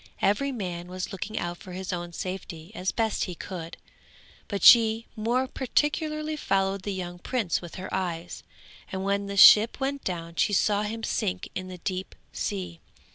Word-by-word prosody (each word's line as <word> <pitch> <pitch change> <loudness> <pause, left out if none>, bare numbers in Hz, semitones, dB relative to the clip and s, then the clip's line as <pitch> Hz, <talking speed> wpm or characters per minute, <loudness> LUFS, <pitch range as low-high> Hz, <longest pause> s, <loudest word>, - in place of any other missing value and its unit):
Every 210 +8 +2
man 180 -7 -4
was 185 0 -5
looking 205 +3 -5
out 175 0 -3
for 185 - -11
his 190 +1 -4
own 175 -1 -4
safety 175 -1 -6
as 190 -3 -1
best 225 -2 0
he 180 - -6
could; 170 -2 -7 0.7
but 200 -1 -3
she 225 -1 +7
more 235 +4 +1
particularly 305 +4 -1
followed 195 -7 0
the 205 - -3
young 175 -2 -5
prince 220 -5 -1
with 175 -2 -9
her 185 - -7
eyes, 175 -2 -3 0.5
and 190 0 -3
when 200 0 0
the 200 0 -5
ship 215 +5 +8
went 275 +1 -2
down 170 -2 -4
she 205 - +2
saw 205 +1 +3
him 220 +2 -4
sink 190 -5 -2
in 185 - -4
the 185 -1 -8
deep 185 +2 -4 0.2
sea. 180 -4 -4
195 Hz, 175 wpm, -27 LUFS, 180-220 Hz, 0.7 s, ship